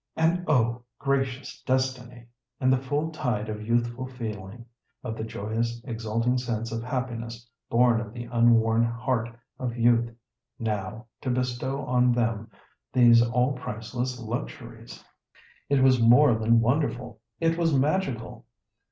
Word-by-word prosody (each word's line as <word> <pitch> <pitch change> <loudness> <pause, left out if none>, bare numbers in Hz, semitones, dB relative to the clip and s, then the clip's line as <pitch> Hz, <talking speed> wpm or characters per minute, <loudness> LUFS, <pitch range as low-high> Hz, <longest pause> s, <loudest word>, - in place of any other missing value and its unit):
And 165 +2 +2
oh, 120 -4 +2 0.2
gracious 135 -1 -2
destiny! 130 -2 -2 0.3
in 130 0 +3
the 130 - +3
full 145 +4 -1
tide 115 -8 -2
of 105 0 -4
youthful 120 +2 0
feeling, 115 -3 -7 0.4
of 110 -3 -4
the 110 - -5
joyous 110 +2 -3
exalting 115 +1 -1
sense 115 -2 -3
of 115 0 -3
happiness 120 -2 -4 0.2
born 120 -1 +4
of 110 -3 -7
the 120 +1 -6
unworn 115 -1 +3
heart 115 0 -1 0.3
of 125 -2 -3
youth, 120 0 +3 0.5
now 110 0 -3 0.2
to 130 - -3
bestow 125 +2 -2
on 125 0 +3
them 115 -2 -1 0.4
these 120 -2 +6
all 125 +3 +2
priceless 125 +1 -4
luxuries! 110 - -7 0.7
It 140 -2 +3
was 130 -2 +5
more 120 +4 +6
than 115 +1 +3
wonderful—it 125 +3 -1
was 165 -1 +1
magical. 135 -7 -1
120 Hz, 130 wpm, -26 LUFS, 115-130 Hz, 0.7 s, these